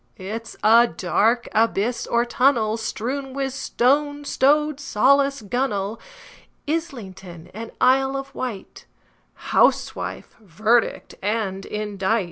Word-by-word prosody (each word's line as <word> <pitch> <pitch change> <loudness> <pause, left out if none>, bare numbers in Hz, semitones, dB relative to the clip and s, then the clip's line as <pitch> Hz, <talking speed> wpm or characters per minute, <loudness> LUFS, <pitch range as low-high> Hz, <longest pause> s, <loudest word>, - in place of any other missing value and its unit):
It's 220 +4 -7
a 230 +2 +6
dark 215 +7 +1
abyss 225 +1 0
or 235 0 +1
tunnel, 240 -3 +2
Strewn 260 +4 -4
with 270 -1 -2
stones, 290 +2 0
like 265 - +6
rowlock, 280 -4 +1
gunwale, 225 -3 -2 0.7
Islington 195 - -5
and 225 +3 -7
Isle 270 +1 +3
of 275 0 -7
Wight, 240 -8 -7 0.6
Housewife, - - +1
verdict 220 +4 0
and 200 -2 -2
indict! 210 +1 -1
235 Hz, 100 wpm, -22 LUFS, 210-270 Hz, 0.7 s, a